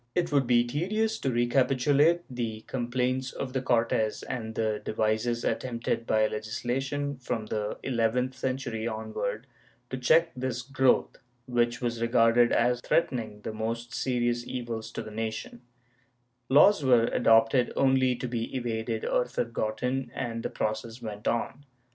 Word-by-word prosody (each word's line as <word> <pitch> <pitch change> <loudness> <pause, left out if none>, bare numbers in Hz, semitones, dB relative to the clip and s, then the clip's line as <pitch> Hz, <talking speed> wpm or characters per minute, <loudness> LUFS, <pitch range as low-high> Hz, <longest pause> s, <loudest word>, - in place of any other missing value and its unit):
It 170 -2 0
would 140 -3 +2
be 120 -1 +4
tedious 215 - -1
to 135 - -1
recapitulate 135 +6 +3
the 115 -5 -4
complaints 130 +2 -2
of 130 -2 -5
the 130 - 0
Cortes 115 -3 +1
and 110 -3 -5
the 110 -1 -1
devices 110 +2 0
attempted 115 -2 -2
by 110 0 +3
legislation 130 +7 -2
from 120 -3 -3
the 105 -1 -3
eleventh 125 +1 0
century 125 -4 -3
onward 110 0 -4 0.5
to 130 - -2
check 165 +6 +4
this 125 -1 -3
growth, 135 -1 +2 0.3
which 120 -1 0
was 120 -1 -2
regarded 115 +1 +4
as 120 +1 +2
threatening 115 -10 0
the 110 - -5
most 115 +2 -4
serious 120 -2 0
evils 120 -3 -4
to - - -4
the 110 - -9
nation/ 110 +2 -5 0.9
Laws 150 +5 +6
were 125 -3 +5
adopted 115 +2 +3
only 130 -2 +3
to 125 - -4
be 115 +1 -3
evaded 115 -2 -2
or 125 - +1
forgotten, 125 +2 -2
and 115 -2 -3
the - - -3
process 110 +2 -3
went 105 -2 -6
on. 120 +4 -1
120 Hz, 140 wpm, -28 LUFS, 115-130 Hz, 0.9 s, Laws